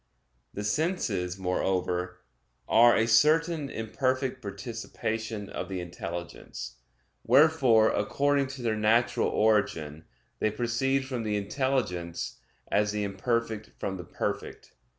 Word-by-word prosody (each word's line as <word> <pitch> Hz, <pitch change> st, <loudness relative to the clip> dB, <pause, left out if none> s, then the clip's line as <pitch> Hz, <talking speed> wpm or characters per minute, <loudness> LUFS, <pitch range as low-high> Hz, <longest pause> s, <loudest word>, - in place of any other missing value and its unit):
The 105 Hz, -, -3 dB
senses, 105 Hz, -, -1 dB
moreover, 90 Hz, -1 st, -1 dB, 0.5 s
are 120 Hz, +2 st, +6 dB
a 115 Hz, -, +3 dB
certain 155 Hz, +5 st, +3 dB
imperfect 130 Hz, +3 st, -1 dB
participation 110 Hz, 0 st, -4 dB
of -, -, -5 dB
the 95 Hz, -1 st, -3 dB
intelligence; 85 Hz, -8 st, -7 dB, 0.5 s
wherefore, 130 Hz, -4 st, +5 dB
according 140 Hz, +6 st, +1 dB
to 130 Hz, -1 st, -8 dB
their 110 Hz, -2 st, +1 dB
natural 110 Hz, +3 st, +2 dB
origin, 80 Hz, -8 st, +1 dB, 0.3 s
they 110 Hz, -, +2 dB
proceed 120 Hz, +5 st, 0 dB
from 130 Hz, -3 st, -3 dB
the 105 Hz, -2 st, -1 dB
intelligence 100 Hz, -, -2 dB, 0.3 s
as 105 Hz, 0 st, +2 dB
the 105 Hz, 0 st, -2 dB
imperfect 110 Hz, +2 st, -2 dB
from 95 Hz, -1 st, -3 dB
the 90 Hz, -, -7 dB
perfect. -, -, -5 dB
110 Hz, 110 wpm, -28 LUFS, 95-130 Hz, 0.5 s, are